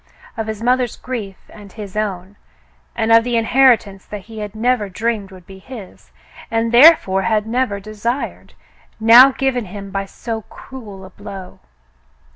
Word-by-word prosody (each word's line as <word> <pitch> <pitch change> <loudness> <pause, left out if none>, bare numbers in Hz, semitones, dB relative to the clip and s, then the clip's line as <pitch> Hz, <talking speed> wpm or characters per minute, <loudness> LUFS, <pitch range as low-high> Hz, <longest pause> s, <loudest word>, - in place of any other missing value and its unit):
Of 225 -2 -4
his 220 0 -5
mother's 250 -1 +1
grief 215 -7 -6
and 205 -2 -13
his 205 -2 -9
own, 200 -2 -3 0.6
and 225 -1 0
of 230 0 +7
this 240 0 -2
inherit 245 +1 +4
ance 195 -2 -13
that 210 -1 -7
he 220 +2 -11
had 210 0 -6
never 225 -2 0
dreamed 215 +1 -2
would 185 -3 -14
be 190 0 -13
his, 215 -2 -12 0.4
and 225 0 0
therefore 240 - +6
had 215 0 0
never 225 -3 -1
desired, 215 +6 -5 0.4
now 235 +4 +8
given 260 -3 -1
him 195 +1 -9
by 195 0 -3
so 225 +3 -6
cruel 210 -8 -11
a 190 - -13
blow. 200 -3 -10
220 Hz, 160 wpm, -18 LUFS, 195-240 Hz, 0.6 s, now